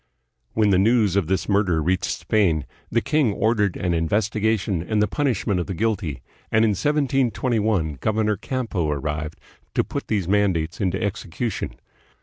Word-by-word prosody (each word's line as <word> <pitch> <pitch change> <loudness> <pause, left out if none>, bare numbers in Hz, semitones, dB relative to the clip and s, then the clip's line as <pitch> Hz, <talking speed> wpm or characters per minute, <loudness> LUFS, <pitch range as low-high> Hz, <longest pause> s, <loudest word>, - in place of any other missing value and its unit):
When 105 -2 +3
the 95 - +4
news 105 -2 +3
of 100 -5 +1
this 90 -1 0
murder 100 -5 +2
reached 90 +4 +1
Spain, 85 -9 +1 0.2
the 115 - +1
king 150 -7 +2
ordered 110 -3 +1
an 90 -1 0
investigation 105 +2 0
and 105 +5 -1
the 105 - +3
punishment 115 -10 0
of 90 - -3
the 95 - -4
guilty, 90 - -1 0.3
and 110 0 +4
in - - +3
1721 115 - +1
Governor 110 0 +1
Campo 105 - -2
arrived 75 +1 -3 0.4
to - - +3
put - - -5
these 100 -6 0
man 100 0 +3
dates 85 +7 -3
into 95 -1 0
execution. 100 +1 -3
100 Hz, 155 wpm, -23 LUFS, 90-110 Hz, 0.4 s, the